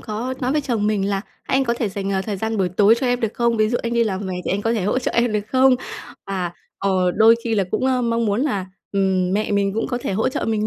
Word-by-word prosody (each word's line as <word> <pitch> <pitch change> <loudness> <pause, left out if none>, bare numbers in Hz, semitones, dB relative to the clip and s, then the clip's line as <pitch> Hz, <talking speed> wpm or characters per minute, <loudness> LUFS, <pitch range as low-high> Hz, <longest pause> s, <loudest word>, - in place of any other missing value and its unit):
có 230 +4 -4
nói 255 +1 0
với 300 - +2
chồng 235 -7 -1
mình 205 -2 0
là: 200 -1 0 0.2
"Anh 265 +1 +1
có 235 -2 0
thể 235 -2 -1
dành, 200 0 -3
à, 190 0 0
thời 205 0 -3
gian 220 +3 -2
buổi 190 -2 +2
tối 205 +5 +4
cho 260 - 0
em 245 0 +1
được 225 -3 -2
không? 235 -1 +1
Ví 215 0 +3
dụ, 240 - 0
anh 235 - -2
đi 235 0 +3
làm 195 -3 -2
về 185 - -3
thì - - -2
anh 200 +2 -1
có 225 - +1
thể 220 -4 -1
hỗ 210 +6 +1
trợ 260 - -2
em 235 -1 +2
được 210 - +1
không?" 260 +1 +5 0.5
Và, 185 -3 -2 0.3
ờ, 185 -2 +1
đôi 225 +2 +6
khi 230 -1 0
là 200 -3 +2
cũng, 260 - 0
ơ, 255 -1 +1
mong 230 -1 0
muốn 205 +2 +1
là, 205 -10 -1 0.3
ừm, 190 -2 +1
mẹ 210 +1 0
mình 200 -1 +1
cũng 225 - -1
có 245 - -2
thể 235 - -3
hỗ 205 +4 +1
trợ - - -3
mình 215 -1 0
215 Hz, 300 wpm, -21 LUFS, 195-235 Hz, 0.5 s, đôi